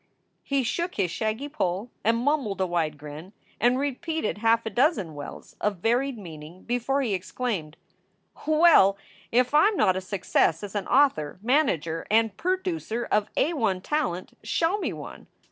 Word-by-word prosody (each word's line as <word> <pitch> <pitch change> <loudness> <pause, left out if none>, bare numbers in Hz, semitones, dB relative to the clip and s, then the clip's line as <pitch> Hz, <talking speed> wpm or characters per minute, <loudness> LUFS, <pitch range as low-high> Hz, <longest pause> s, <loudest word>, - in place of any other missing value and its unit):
He 275 -1 0
shook 340 +9 -2
his 185 -4 0
shaggy 220 +8 -2
poll 220 -6 -2
and 230 +1 +3
mumbled 255 -6 0
a 190 - +2
wide 165 -4 -1
grin, 150 +6 -10 0.3
and 245 +3 +3
repeated 285 -3 -2
half 230 +1 +3
a 220 - -3
dozen 240 - +1
Well 145 -1 -7
s - - -21
of 205 -2 0
varied 240 +7 0
meaning, 165 -2 -10
before 245 +3 0
he 225 -6 -1
exclaimed: 185 -4 -3 0.7
"Well, 310 - +6 0.3
if 250 +3 +2
I 305 +6 +6
m 425 -2 0
not 185 - +3
a 185 - -2
success 185 -3 +1
as 205 - -6
an 205 -2 -3
author, 250 - +2
manager, 185 - +1
and 220 -1 +3
perdoocer 340 - -2
of 210 0 +2
A 325 - +2
i 225 - +1
talent, 265 - -2
show 345 +5 0
me - - -2
one. - - -9
225 Hz, 165 wpm, -26 LUFS, 185-280 Hz, 0.7 s, Well